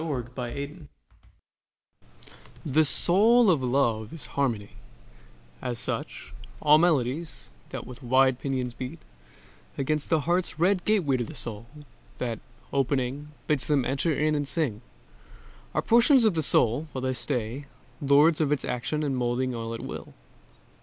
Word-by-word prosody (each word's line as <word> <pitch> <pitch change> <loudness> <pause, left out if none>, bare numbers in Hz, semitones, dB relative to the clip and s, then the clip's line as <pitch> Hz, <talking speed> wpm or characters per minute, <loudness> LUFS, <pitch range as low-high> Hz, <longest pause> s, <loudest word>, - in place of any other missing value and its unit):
THE 140 -7 -3
SYMPHONY 140 +6 -6 1.8
The 155 +2 +3
soul 210 - +5
of 155 -6 +1
love 120 -4 0
is 165 - -8
harmony: 115 -8 -1 0.9
as 120 -1 -3
such 115 - -5 0.3
All 150 +1 +5
melodies, 155 - 0 0.2
that - - -6
with 125 +1 -11
wide 130 0 +3
pinions 130 -3 -2
beat 130 +1 -6 0.8
Against 145 +2 -1
the 160 -2 +2
heart's 175 +3 0
red 180 +2 +2
gateway 175 -11 +2
to 120 - -1
the 150 - -9
soul, 115 -3 -7 0.5
That, 115 -3 -3 0.3
opening, 135 +1 -1 0.2
bids 150 -4 0
them 145 -4 +2
enter 140 +6 0
in 155 +1 +1
and 145 -1 -1
sing, 135 - -2 0.9
Are - - +1
portions 240 +2 +5
of 215 - +4
the 160 - 0
soul, 120 -4 +3
and 160 - -9
while 130 - -4
they 130 0 0
stay, 125 +1 -3 0.4
Lords 150 +3 +4
of 150 -2 +1
its 150 - 0
action 125 +5 -2
molding 125 +1 -1
all 115 -1 -4
at - - -7
will. - - -8
140 Hz, 145 wpm, -27 LUFS, 125-155 Hz, 1.8 s, soul